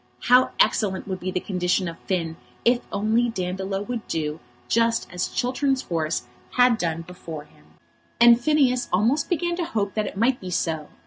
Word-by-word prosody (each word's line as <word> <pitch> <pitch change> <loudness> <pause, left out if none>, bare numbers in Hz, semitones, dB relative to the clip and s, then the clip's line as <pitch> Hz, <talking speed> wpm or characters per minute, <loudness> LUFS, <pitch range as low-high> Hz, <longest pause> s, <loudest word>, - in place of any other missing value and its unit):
How 250 +1 +6
excellent 195 -3 +2
would 190 -2 -3
be 185 - -3
the 185 - -1
condition 180 0 0
of 165 0 -7
Finn 165 -4 -1 0.3
if 240 +1 +4
only 220 +4 +1
Dandolo 190 -1 -3
would 235 0 -5
do 155 -1 -2 0.3
just 230 0 +2
as 180 0 -1
Chiltern's 265 +1 0
horse 160 -4 -1 0.3
had 245 -2 +5
done 165 -1 -2
before 165 -3 -8
him! 110 - -23 0.5
And 235 0 +7
Phineas 260 -3 +2
almost 230 +11 +2
began 345 -1 0
to 355 - -1
hope 205 - -2
that 215 -2 -1
it - - -7
might 245 +4 +2
be 185 - -6
so. 160 -3 -1
200 Hz, 175 wpm, -24 LUFS, 180-245 Hz, 0.5 s, And